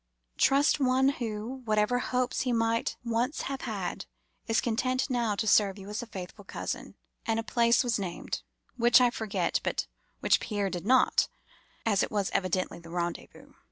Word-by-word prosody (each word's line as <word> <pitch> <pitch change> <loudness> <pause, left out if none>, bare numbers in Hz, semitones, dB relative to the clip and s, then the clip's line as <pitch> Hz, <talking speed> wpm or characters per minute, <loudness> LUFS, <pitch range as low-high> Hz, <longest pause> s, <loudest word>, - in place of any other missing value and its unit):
Trust 280 +2 +4
one 265 0 +3
who, 235 0 -4
whatever 215 +3 +2
hopes 250 0 -1
he 255 - 0
might 230 0 0
once 235 +5 0
have 275 0 -4
had, - - -4 0.4
is 225 -1 +2
content 255 +3 0
now 235 -4 +1
to 210 - -1
serve 205 -2 +4
you 195 0 -9
as 210 +3 -3
a 240 - -8
faithful 195 0 -8
cousin;' - - -5 0.3
and 225 0 +1
a - - -2
place 235 +1 +3
was 235 -3 0
named, 180 -3 -4 0.4
which 240 +1 +6
I 245 -1 +4
forget, 220 -3 -1
but - - -1 0.3
which - - +3
Pierre 205 -3 -2
did 180 +2 -5
not, 260 +1 +4 0.6
as 205 -3 +3
it - - 0
was 205 -2 -1
evidently 185 -2 -1
the 165 -1 -13
rendezvous. 175 0 -5
225 Hz, 170 wpm, -29 LUFS, 205-250 Hz, 0.6 s, which